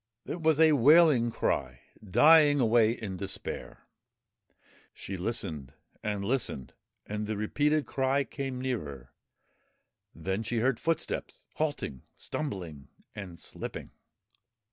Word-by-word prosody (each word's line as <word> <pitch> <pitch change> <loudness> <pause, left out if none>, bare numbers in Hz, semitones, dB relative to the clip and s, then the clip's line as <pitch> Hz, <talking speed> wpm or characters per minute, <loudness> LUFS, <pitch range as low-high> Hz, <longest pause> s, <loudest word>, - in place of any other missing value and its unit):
It 170 - -5
was 160 -1 +3
a 160 -1 +7
wailing 145 -2 +6
cry, 65 - -2 0.2
dying 145 - +6
away 115 -2 +4
in 110 -5 -4
despair. 95 +1 -6 1.1
She 95 - -6
listened 90 - -4 0.3
and 105 -2 -2
listened, 115 - -2 0.3
and 105 0 -4
the 110 -1 -2
repeated 145 +8 +1
cry 135 +1 +1
came 135 -2 -5
nearer; 75 - -4 1.0
then 95 +3 -2
she 115 +1 -2
heard 125 +2 +1
footsteps 165 -1 -2
halting, 145 - -3
stumbling 90 - -5 0.3
and 95 -5 -8
slipping. - - -7
115 Hz, 110 wpm, -29 LUFS, 95-145 Hz, 1.1 s, a